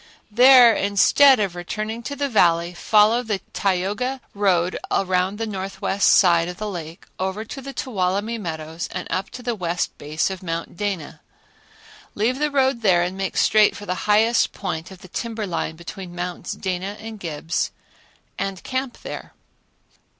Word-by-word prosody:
There 245 +1 +8
instead 215 +7 +5
of 195 -4 0
returning 215 +6 -4
to 285 +4 -5
the 285 0 -1
Valley, 175 -7 +3
follow 215 +6 +4
the 215 -5 -2
Tioga 205 +8 -1
road 185 -3 +1
around 185 +1 +1
the 225 - -2
northwest 195 -1 -1
side 170 -3 +5
of 180 0 -6
the 215 - -4
lake, 170 -4 -7
over 190 +4 -2
to 270 +4 -8
the 275 +1 -7
Tuolumne 210 -2 -2
Meadows 160 -1 -5
and 180 - -4
up 190 +1 -2
to 250 - -10
the 240 0 -1
west 175 -4 -2
base 155 +5 -1
of 190 - -6
Mount 165 -2 -4
Dana. 195 -6 -4 0.9
Leave 240 +6 0
the 300 0 +1
road 265 -3 +1
there 180 -5 +4
and 180 +2 -3
make 195 -1 -3
straight 215 -1 +4
for 205 - -8
the 180 0 -4
highest 225 +3 +3
point 165 -3 -5
on 190 - -10
the - - -10
timber 225 +3 -4
line 170 -3 -3
between 175 +1 -9
Mounts 175 0 -4
Dana 190 +2 -4
and 220 -1 -8
Gibbs 165 -1 -2 0.7
and 195 -2 -3
camp 260 -1 -4
there. - - -8
195 Hz, 165 wpm, -22 LUFS, 180-225 Hz, 0.9 s, There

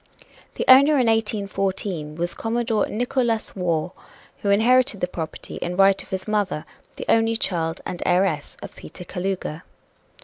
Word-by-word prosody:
The - - -2
owner 275 +4 +8
in 255 - +3
1814 195 -7 -1
was 175 +2 -2
Commodore 225 -2 -1
Nickolas 240 0 -1
Waugh, 175 -3 -1 0.5
who 200 - -3
inherited 235 +2 +3
the - - +1
property 160 -3 -6
in 175 +1 -4
right 195 0 +5
of - - -14
his 190 0 -4
mother, 205 -7 -1 0.3
the - - -6
only 225 0 +3
child 165 -6 -2
and 175 - -5
heiress 175 -5 0
of - - -9
Peter 175 - -10
Kalouga. 180 -4 -4
195 Hz, 145 wpm, -23 LUFS, 175-225 Hz, 0.5 s, owner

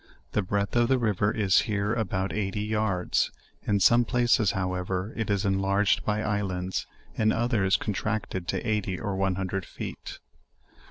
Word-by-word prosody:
The 105 - +1
breadth 100 +2 -1
of 120 0 +4
the 130 +1 +3
river 105 -3 +1
is 100 -4 +3
here 105 +1 0
about 100 -4 -1
eighty 105 0 -2
yards: 105 -4 0 0.4
in 100 -1 +2
some 120 +5 +5
places 120 -3 +2
however, 90 +1 -2
it 110 -2 -3
is 100 0 +1
enlarged 100 +1 +2
by 105 0 0
islands, 95 -3 -2 0.3
in 110 0 +2
others 110 -5 +2
contracted 100 -3 -3
to - - -2
eighty 105 -4 -1
or 100 -1 -3
one 95 -1 +1
hundred 95 0 -2
feet. - - -7
100 Hz, 155 wpm, -27 LUFS, 95-110 Hz, 0.4 s, some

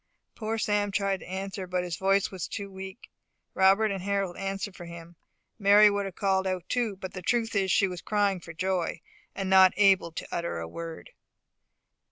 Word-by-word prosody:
Poor 220 0 -3
Sam 205 -1 +1
tried 195 -1 0
to - - -12
answer, 190 0 -5
but 180 0 -1
his 175 -2 -3
voice 195 +2 +1
was 185 -4 -5
too 200 -1 -6
weak. 190 +3 -9 0.4
Robert 195 +3 +4
and 195 -2 -3
Harold 195 -2 -1
answered 195 0 -4
for 175 - -9
him. 170 0 -10 0.4
Mary 205 +1 +7
would 200 0 -1
have 190 -2 -7
called 190 -1 +1
out 185 -2 -3
too; 235 -5 -1
but 190 -1 -8
the 185 - -6
truth 230 +3 0
is 195 -1 +1
she 195 - +4
was 180 -2 -6
crying 205 -3 +1
for 170 - -10
joy, 180 +1 -1 0.4
and 195 -1 -3
was - - -3
not 190 -1 +7
able 195 -4 +4
to 160 - -6
utter 170 - -2
a 85 0 -5
word. 165 - -8
190 Hz, 200 wpm, -28 LUFS, 180-200 Hz, 0.4 s, Mary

